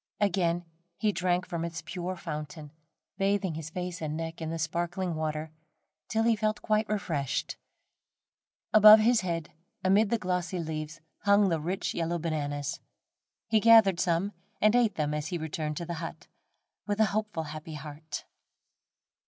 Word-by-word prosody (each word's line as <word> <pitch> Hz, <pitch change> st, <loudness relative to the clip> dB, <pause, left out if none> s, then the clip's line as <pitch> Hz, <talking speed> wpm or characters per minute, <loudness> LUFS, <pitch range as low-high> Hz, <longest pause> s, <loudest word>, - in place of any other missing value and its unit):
Again 175 Hz, -3 st, +1 dB, 0.3 s
he 215 Hz, -, +2 dB
drank 180 Hz, -1 st, 0 dB
from 170 Hz, -1 st, -3 dB
its 170 Hz, -1 st, -5 dB
pure 180 Hz, +2 st, -4 dB
fountain, 150 Hz, -2 st, -6 dB, 0.5 s
bathing 195 Hz, -2 st, +1 dB
his 160 Hz, 0 st, -6 dB
face 180 Hz, 0 st, -5 dB
and 155 Hz, -1 st, -3 dB
neck 165 Hz, 0 st, -5 dB
in 160 Hz, -, -3 dB
the 165 Hz, -, -3 dB
sparkling 170 Hz, +3 st, -2 dB
water, 155 Hz, 0 st, -3 dB, 0.6 s
till 225 Hz, 0 st, +1 dB
he 230 Hz, 0 st, +4 dB
felt 215 Hz, 0 st, -1 dB
quite 215 Hz, 0 st, +1 dB
refreshed. 165 Hz, -10 st, -2 dB, 1.2 s
Above 215 Hz, 0 st, +10 dB
his 230 Hz, +1 st, +4 dB
head, 170 Hz, -4 st, -3 dB, 0.3 s
amid 200 Hz, +3 st, +4 dB
the 235 Hz, -, +2 dB
glossy 180 Hz, -2 st, -2 dB
leaves 155 Hz, -1 st, -5 dB, 0.2 s
hung 200 Hz, -1 st, +4 dB
the 165 Hz, -2 st, +1 dB
rich 180 Hz, +5 st, -2 dB
yellow 170 Hz, +1 st, -1 dB
bananas. 145 Hz, -3 st, -3 dB, 0.7 s
He 220 Hz, -1 st, +3 dB
gathered 220 Hz, -5 st, +6 dB
some 185 Hz, +3 st, +1 dB, 0.3 s
and 215 Hz, +2 st, +4 dB
ate 230 Hz, -5 st, +3 dB
them 150 Hz, -1 st, -1 dB
as 150 Hz, 0 st, -2 dB
he 175 Hz, -, -2 dB
returned 155 Hz, -1 st, -3 dB
to 170 Hz, -, -4 dB
the 170 Hz, -, -4 dB
hut, 165 Hz, -, -7 dB, 0.6 s
with 205 Hz, 0 st, -1 dB
a 220 Hz, -, +6 dB
hopeful, 210 Hz, -6 st, -1 dB
happy 155 Hz, +1 st, -7 dB
heart. 150 Hz, +1 st, -7 dB
170 Hz, 155 wpm, -29 LUFS, 155-200 Hz, 1.2 s, Above